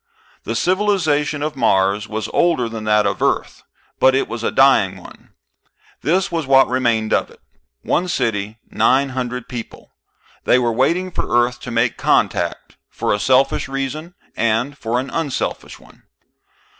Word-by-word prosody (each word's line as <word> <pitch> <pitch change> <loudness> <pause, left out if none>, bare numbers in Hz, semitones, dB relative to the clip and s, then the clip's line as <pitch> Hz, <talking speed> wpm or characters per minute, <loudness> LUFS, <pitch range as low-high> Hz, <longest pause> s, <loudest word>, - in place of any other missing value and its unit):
The - - -3
civilization 160 -7 +1
of 155 0 -3
Mars 100 -3 +1
was 110 0 -4
older 165 -9 +1
than 115 -1 -6
that 105 -1 +3
of 100 -1 -1
Earth, - - -1 0.4
but 130 0 +5
it 135 - 0
was 115 0 -6
a - - +1
dying 105 -8 +3
one. 90 - -16 0.7
This 180 +4 +1
was 165 -4 -2
what 135 0 +5
remained 120 -4 0
of - - +1
it: - - -19 0.4
one 180 - 0
city, 110 - -2
nine 135 +2 +2
hundred 125 -1 -4
people. 120 -2 -9 0.5
They - - +4
were 120 -2 +1
waiting 170 +10 +1
for - - -4 0.2
Earth 120 0 -7
to 125 - -8
make 115 0 0
contact, - - 0
for - - -1
a 105 - -1
selfish 135 +6 +2
reason 135 +6 -5 0.2
and 115 +5 0
for 120 -2 -2
an 135 +2 -5
unselfish 160 -5 -3
one. - - -20
130 Hz, 155 wpm, -19 LUFS, 115-150 Hz, 0.7 s, but